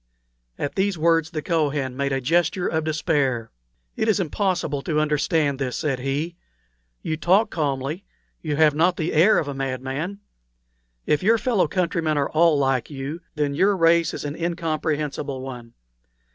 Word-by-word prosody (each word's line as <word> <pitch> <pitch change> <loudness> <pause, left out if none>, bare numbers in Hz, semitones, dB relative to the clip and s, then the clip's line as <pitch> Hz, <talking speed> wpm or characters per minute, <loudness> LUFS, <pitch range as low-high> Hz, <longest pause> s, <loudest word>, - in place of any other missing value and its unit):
At 145 - -3
these 195 -1 0
words 165 0 +2
the 155 -3 -5
Kohen 145 -6 0
made 140 +1 -1
a 135 - 0
gesture 170 +6 +1
of 160 -1 -1
despair. 145 -7 0 0.4
"It 220 - -1
is 215 -2 +3
impossible 175 -4 -1
to 150 +1 0
understand 150 -1 +1
this," 125 -3 -2
said 140 -5 -1
he. 145 +6 -3 0.7
"You 155 - -2
talk 195 +6 +3
calmly; 145 +3 -2 0.4
you 150 -3 -2
have 155 0 +4
not 175 +4 +2
the 160 0 -2
air 180 +8 +5
of 150 - 0
a 140 - -3
madman. 135 +7 -4 0.9
If 150 - +2
your 225 +4 +4
fellow 225 -3 +1
countrymen 165 -4 0
are 140 - 0
all 160 -1 +4
like 135 -3 +1
you, 145 +4 -6
then 145 -2 0
your 190 +6 +2
race 165 -1 +4
is - - -6
an 145 0 -4
incomprehensible 155 -4 -2
one. 125 -3 -8
155 Hz, 160 wpm, -23 LUFS, 140-170 Hz, 0.9 s, air